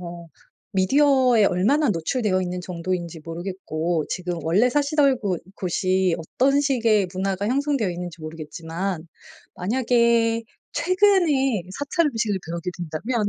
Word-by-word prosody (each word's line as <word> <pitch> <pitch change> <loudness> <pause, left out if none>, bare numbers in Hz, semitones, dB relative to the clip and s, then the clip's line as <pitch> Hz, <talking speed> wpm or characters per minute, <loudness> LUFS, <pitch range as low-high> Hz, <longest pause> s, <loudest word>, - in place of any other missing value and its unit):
어 170 -1 -8 0.4
미디어에 250 +3 +4
얼마나 220 +10 +2
노출되어 185 +3 0
있는 180 0 -3
정도인지 175 -2 -4
모르겠고 165 -2 -3
지금 180 -2 -3
원래 200 +11 +3
사시던 285 -1 +3
곳 190 -5 -2
곳이 185 -1 +1
어떤 265 - +1
식의 230 -9 +2
문화가 195 +1 -1
형성되어 275 -5 0
있는지 175 -2 -7
모르겠지만 165 +3 -5 0.5
만약에 230 +1 +2 0.3
최근에 340 - +2
사찰 300 +3 +1
음식을 220 -7 -1
배우게 170 +2 -4
된다면 205 +7 -2
195 Hz, 305 characters per minute, -23 LUFS, 175-255 Hz, 0.5 s, 미디어에